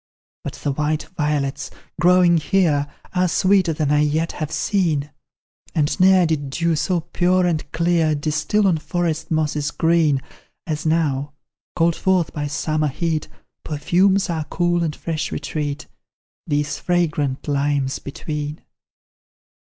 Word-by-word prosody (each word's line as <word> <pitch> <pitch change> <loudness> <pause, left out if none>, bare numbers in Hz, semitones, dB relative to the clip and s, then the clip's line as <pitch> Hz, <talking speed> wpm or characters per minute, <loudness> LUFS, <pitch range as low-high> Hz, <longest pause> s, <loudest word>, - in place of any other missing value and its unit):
But - - -5
the 145 - -3
white 150 +2 -1
violets, 145 -3 -1 0.3
growing 175 -1 +5
here, 155 -4 +2 0.3
Are 180 0 +2
sweeter 185 0 +3
than 150 -2 -1
I 150 - +4
yet 155 +2 +1
have 155 -2 -5
seen, 160 -9 0 0.6
And 150 -1 +1
ne'er 185 -1 +6
did 150 -4 -1
dew 170 +4 0
so 175 +2 0
pure 180 +2 +1
and 160 -4 -1
clear 170 -2 +2
Distil 155 +7 0
on 175 -5 +3
forest 160 0 -2
mosses 150 -2 0
green, 160 -4 +2 0.5
As 155 -1 -3
now, 145 -3 0 0.4
called 165 0 +2
forth 185 -4 +1
by 145 -1 -3
summer 155 +1 -1
heat, 155 +2 -2 0.4
Perfumes 185 +6 +2
our 160 -4 -2
cool 175 +1 0
and 155 -2 -2
fresh 160 -2 -3
retreat 145 0 -3 0.6
These 145 0 -1
fragrant 155 -7 0
limes 140 -1 0
between. 150 +1 -5
155 Hz, 130 wpm, -21 LUFS, 145-175 Hz, 0.6 s, ne'er